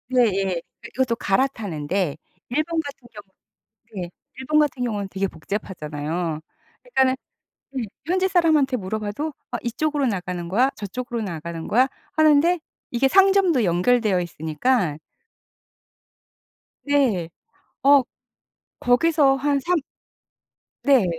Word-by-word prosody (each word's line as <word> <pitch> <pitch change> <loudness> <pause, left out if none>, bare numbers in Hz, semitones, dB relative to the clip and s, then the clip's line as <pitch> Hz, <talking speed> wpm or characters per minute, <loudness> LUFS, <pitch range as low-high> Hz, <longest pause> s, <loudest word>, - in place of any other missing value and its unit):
예예. 195 -6 +3 0.3
이 - - -5
이것도 255 -3 +1
갈아타는데 195 - -1 0.3
일본 310 +6 0
같은 280 -4 -10
경우 210 -1 -10 0.8
예 175 - -9 0.3
일본 300 +4 +1
같은 290 -4 +1
경우는 205 -4 -2
되게 195 +1 -1
복잡하잖아요. 160 -3 -4 0.4
그러니까는 265 - +2 0.6
네 265 -2 -2 0.2
현지 370 +3 +2
사람한테 315 -8 +3
물어봐도 210 +8 -3 0.2
"어 - - 0
이쪽으로 290 +4 0
나가는 180 -5 -3
거야, 245 +9 +3
저쪽으로 235 +4 -4
나가는 170 -3 -5
거야." 255 +4 +4 0.2
하는데 310 +3 +4 0.3
이게 245 +2 +2
상점도 385 - +4
연결되어 190 +2 +2
있으니까 165 - 0 1.9
네. 255 - +2 0.5
어 280 0 +7 0.8
거기서 275 +2 +4
한 280 +1 +1
3 350 +5 +1 1.0
네. 270 -7 +5
245 Hz, 260 characters per minute, -23 LUFS, 185-285 Hz, 1.9 s, 어